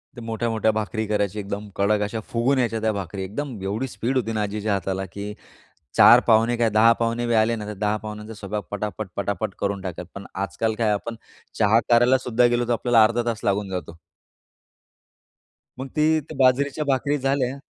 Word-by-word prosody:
ते 120 Hz, -, -9 dB
मोठ्या-मोठ्या 115 Hz, -1 st, 0 dB
भाकरी 110 Hz, 0 st, -2 dB
करायची, 105 Hz, -1 st, -1 dB
एकदम 100 Hz, +1 st, -5 dB
कडक 105 Hz, +1 st, +2 dB
अशा 105 Hz, +2 st, -2 dB
फुगून 120 Hz, +4 st, +1 dB
यायच्या 115 Hz, -3 st, 0 dB
त्या 110 Hz, 0 st, +1 dB
भाकरी, 95 Hz, -1 st, -5 dB
एकदम 125 Hz, +7 st, -5 dB
एवढी 105 Hz, +7 st, -2 dB
स्पीड 130 Hz, +1 st, -2 dB
होती 115 Hz, -3 st, -1 dB
ना 110 Hz, -, -1 dB
आजीच्या 105 Hz, +1 st, -2 dB
हाताला, 95 Hz, 0 st, -2 dB
की 100 Hz, +3 st, -7 dB, 0.6 s
4 -, -, +8 dB
पाहुणे 115 Hz, +2 st, +4 dB
काय, 115 Hz, -1 st, +2 dB
10 110 Hz, +2 st, +6 dB
पाहुणे 115 Hz, +1 st, 0 dB
बी 120 Hz, -, +1 dB
आले 110 Hz, +1 st, +3 dB
ना, 105 Hz, -2 st, -6 dB
तर 105 Hz, -, -5 dB
10 105 Hz, +1 st, 0 dB
पाहुण्यांचा 105 Hz, +1 st, -7 dB
स्वयंपाक 105 Hz, 0 st, -5 dB
पटापट-पटापट 100 Hz, -2 st, -3 dB
करून 100 Hz, -1 st, -1 dB
टाकलं. 90 Hz, -2 st, -6 dB
पण 100 Hz, 0 st, -8 dB, 0.2 s
आजकाल 110 Hz, +5 st, -2 dB
काय, 110 Hz, -2 st, +2 dB
आपण 115 Hz, +3 st, -3 dB, 0.4 s
चहा 110 Hz, +1 st, +4 dB
करायला 120 Hz, +2 st, +5 dB
सुद्धा 125 Hz, -1 st, +2 dB
गेलो, 120 Hz, 0 st, +1 dB
तर -, -, +2 dB
आपल्याला 120 Hz, 0 st, +4 dB
अर्धा 115 Hz, +2 st, +1 dB
तास 115 Hz, -2 st, -2 dB
लागून 100 Hz, 0 st, 0 dB
जातो. 90 Hz, -3 st, -6 dB, 1.8 s
मग 130 Hz, -, -4 dB
ती 155 Hz, +1 st, +3 dB
त्या 155 Hz, +1 st, -10 dB
बाजरीच्या 135 Hz, +3 st, +2 dB
भाकरी 140 Hz, +1 st, +1 dB
झाल्या 135 Hz, -1 st, 0 dB
110 Hz, 185 wpm, -23 LUFS, 100-120 Hz, 1.8 s, 4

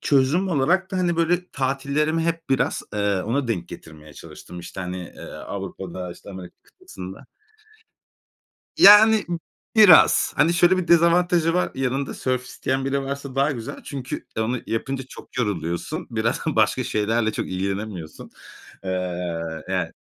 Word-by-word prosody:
çözüm 145 Hz, +7 st, +2 dB
olarak 175 Hz, +5 st, +1 dB
da, 190 Hz, -, -3 dB
hani, 175 Hz, -2 st, +1 dB
böyle 175 Hz, +2 st, +1 dB
tatillerimi 140 Hz, +4 st, -1 dB
hep 165 Hz, -2 st, -3 dB
biraz, 135 Hz, -, +1 dB
eee, 100 Hz, -2 st, 0 dB
ona 125 Hz, +4 st, -1 dB
denk 90 Hz, -7 st, -2 dB
getirmeye 75 Hz, -1 st, -12 dB
çalıştım. 90 Hz, -, -11 dB
İşte, 90 Hz, +2 st, -8 dB
hani, 90 Hz, 0 st, -4 dB, 0.2 s
eee, -, -, -12 dB
Avrupa'da 95 Hz, -2 st, -7 dB
işte 100 Hz, -, -13 dB
Amerika 95 Hz, -2 st, -10 dB
kıtasında. 95 Hz, +1 st, -11 dB, 1.5 s
Yani 210 Hz, +1 st, +8 dB
b 170 Hz, -1 st, -2 dB, 0.4 s
biraz. 205 Hz, -7 st, +7 dB
Hani, 165 Hz, +4 st, +3 dB
şöyle 175 Hz, +1 st, +4 dB
bir 175 Hz, -2 st, -3 dB
dezavantajı 170 Hz, 0 st, +4 dB
var. 180 Hz, -, +1 dB
Yanında 135 Hz, +1 st, -2 dB
sörf 130 Hz, -1 st, -2 dB
isteyen 130 Hz, +1 st, -2 dB
biri 135 Hz, 0 st, -1 dB
varsa 140 Hz, -1 st, -5 dB
daha 140 Hz, +2 st, +2 dB
güzel. 115 Hz, -3 st, -7 dB
Çünkü, 135 Hz, -2 st, -6 dB
eee, 110 Hz, -, +1 dB
onu 120 Hz, +2 st, -2 dB
yapınca 130 Hz, +4 st, -3 dB
çok -, -, -13 dB
yoruluyorsun. 105 Hz, -, -2 dB
Biraz 115 Hz, 0 st, -1 dB
başka 130 Hz, -3 st, +2 dB
şeylerle 110 Hz, +1 st, 0 dB
çok -, -, -3 dB
ilgilenemiyorsun. 95 Hz, -2 st, -5 dB, 0.5 s
Eee, 90 Hz, -3 st, -3 dB
yani -, -, -1 dB
130 Hz, 145 wpm, -23 LUFS, -, 1.5 s, Yani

